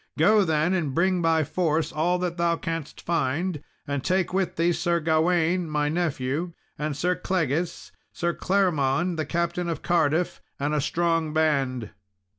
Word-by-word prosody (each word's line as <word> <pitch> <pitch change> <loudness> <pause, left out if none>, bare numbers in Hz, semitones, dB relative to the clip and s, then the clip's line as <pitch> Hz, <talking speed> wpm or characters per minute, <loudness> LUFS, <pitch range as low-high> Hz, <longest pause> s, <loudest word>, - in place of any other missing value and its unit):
Go 205 +7 +5
then, 160 +1 +1
and 155 -8 -1
bring 185 +1 +2
by 165 -1 +3
force 160 0 0
all 170 +4 +1
that 180 -1 -2
thou 170 0 +2
canst 165 -3 -5
find; 165 0 -1 0.2
and 140 -2 -3
take 185 0 0
with 190 -2 0
thee 170 +1 +2
Sir 170 0 +1
Gawain, 165 +2 +2
my 150 -1 0
nephew, 160 0 -1 0.2
and 150 -1 -3
Sir 180 +4 +1
Clegis, 170 -3 -2 0.2
Sir 170 0 -1
Claremond 175 -4 +1
the 155 -2 -2
Captain 170 +1 -1
of 165 -3 -4
Cardiff, 170 0 +1 0.2
and 145 +2 -1
a 150 - +1
strong 165 0 0
band." 135 -7 0
165 Hz, 155 wpm, -25 LUFS, 150-175 Hz, 0.2 s, Go